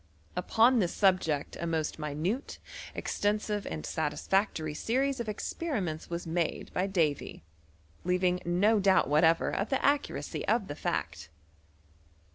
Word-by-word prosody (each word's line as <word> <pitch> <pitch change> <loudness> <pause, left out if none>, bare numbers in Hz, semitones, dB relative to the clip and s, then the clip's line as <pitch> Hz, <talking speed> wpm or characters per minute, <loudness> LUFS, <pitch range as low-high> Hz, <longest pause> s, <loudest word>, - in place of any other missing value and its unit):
Upon 230 +7 +4
this 180 -4 0
subject 185 -7 +1
a 170 - -2
most 160 -1 -2
minute, 155 - -2 0.4
extensive, 210 0 -1
and 75 -1 -5
satisfactory 160 +1 0
series 265 - 0
of 235 -2 -3
experiments 205 - -3
was 170 +1 -4
made 165 0 -2
by 185 +2 0
Davy, 160 - -1 0.6
leavmg 180 0 +1
no 200 +6 +3
doubt 190 -1 +4
whatever 160 +3 +3
of 200 - -1
the 270 - 0
accuracy 285 0 0
of 230 -4 +2
the - - -2
£aict. - - -3
180 Hz, 125 wpm, -30 LUFS, 160-215 Hz, 0.6 s, Upon